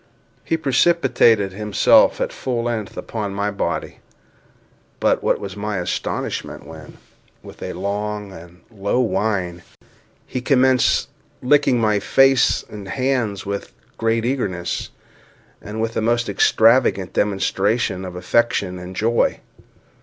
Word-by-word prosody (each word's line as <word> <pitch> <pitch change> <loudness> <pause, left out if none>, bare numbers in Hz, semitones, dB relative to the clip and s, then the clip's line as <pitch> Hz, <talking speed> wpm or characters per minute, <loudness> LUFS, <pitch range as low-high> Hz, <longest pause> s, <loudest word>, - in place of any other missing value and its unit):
He 165 - 0
precipitated 130 - +3
himself 105 +1 +4
at - - -2
full 120 -3 -3
length 115 -4 -3
upon 105 -3 -4
my 100 +1 -1
body; 100 - -3 1.0
but - - +2
what - - +1
was 100 -1 -7
my 105 0 -3
astonishment, 90 0 -4
when, 80 -1 -12 0.5
with - - -13
a - - -5
long 105 +2 -4
and 85 0 -13
low 100 +3 -1
whine, 100 -7 -1 0.6
he 125 - -4
commenced 130 -1 +3 0.4
licking 130 -2 +3
my 105 -2 +2
face 135 +5 +3
and 105 -2 -9
hands 125 -5 -1
with 100 0 -4
the - - -29 0.3
greatest 115 0 +1
eagerness, 95 -10 -3 0.7
and 105 +1 -7
with 115 0 -1
the - - -1
most 120 +2 +1
extravagant 110 -2 +3
demonstration 100 0 0
of 90 -1 -7
affection 90 -1 0
and 90 +1 -9
joy! 115 +4 +1
105 Hz, 125 wpm, -20 LUFS, 95-120 Hz, 1.0 s, himself